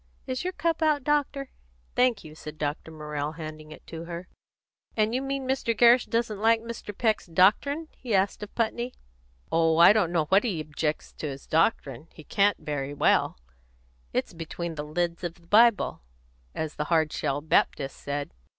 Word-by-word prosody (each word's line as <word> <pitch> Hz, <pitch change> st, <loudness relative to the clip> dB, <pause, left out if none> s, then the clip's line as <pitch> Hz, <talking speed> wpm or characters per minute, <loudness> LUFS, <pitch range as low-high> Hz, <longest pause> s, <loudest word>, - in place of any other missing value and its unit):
Is 255 Hz, +3 st, -3 dB
your 370 Hz, +1 st, -2 dB
cup 330 Hz, +1 st, -1 dB
out, 305 Hz, -3 st, +2 dB
doctor?" 285 Hz, -2 st, 0 dB, 0.4 s
"Thank 250 Hz, -4 st, +2 dB
you," 155 Hz, -1 st, -11 dB
said 155 Hz, 0 st, -9 dB
the -, -, -27 dB
doctor, 150 Hz, +1 st, -3 dB, 0.4 s
handing 155 Hz, -1 st, -8 dB
it -, -, -11 dB
up -, -, -36 dB
to 165 Hz, 0 st, -7 dB
her. 170 Hz, +1 st, -7 dB, 0.7 s
"And 215 Hz, +1 st, +2 dB
you 255 Hz, -, 0 dB
mean 275 Hz, -1 st, -3 dB
Mr. 255 Hz, -4 st, 0 dB
Gerrish 240 Hz, +2 st, +6 dB
doesn't 230 Hz, -3 st, -1 dB
like 225 Hz, +1 st, +4 dB
Mr. 230 Hz, -2 st, -7 dB
Peck's 220 Hz, -5 st, +1 dB
doctrine?" 215 Hz, -, +3 dB
he 235 Hz, -5 st, -2 dB
asked 195 Hz, +2 st, +1 dB
of 210 Hz, -, -8 dB
Putney. 235 Hz, +2 st, -1 dB, 0.6 s
"Oh, 165 Hz, -1 st, +3 dB
I 170 Hz, +4 st, +9 dB
don't 205 Hz, -6 st, +2 dB
know 160 Hz, -3 st, +1 dB
that 195 Hz, +2 st, +6 dB
he 200 Hz, -9 st, -1 dB
objects 155 Hz, 0 st, -3 dB
to 155 Hz, -, -3 dB
his 135 Hz, -1 st, -7 dB
doctrine; 155 Hz, -, 0 dB
he 155 Hz, -, -12 dB
can't 200 Hz, +5 st, +2 dB
very 145 Hz, -1 st, -4 dB
well; -, -, +2 dB, 0.7 s
it's -, -, -2 dB
'between 165 Hz, +1 st, -5 dB
the 150 Hz, -2 st, -5 dB
leds 170 Hz, +3 st, -2 dB
of 175 Hz, -1 st, -3 dB
the 170 Hz, -, -23 dB
Bible,' 220 Hz, +3 st, +4 dB, 0.5 s
as 155 Hz, -1 st, -4 dB
the 150 Hz, -, -1 dB
Hard 160 Hz, -1 st, +2 dB
shell 145 Hz, -1 st, -1 dB
Baptist 145 Hz, -2 st, +1 dB
said. 145 Hz, 0 st, -4 dB
180 Hz, 180 wpm, -27 LUFS, 155-235 Hz, 0.7 s, I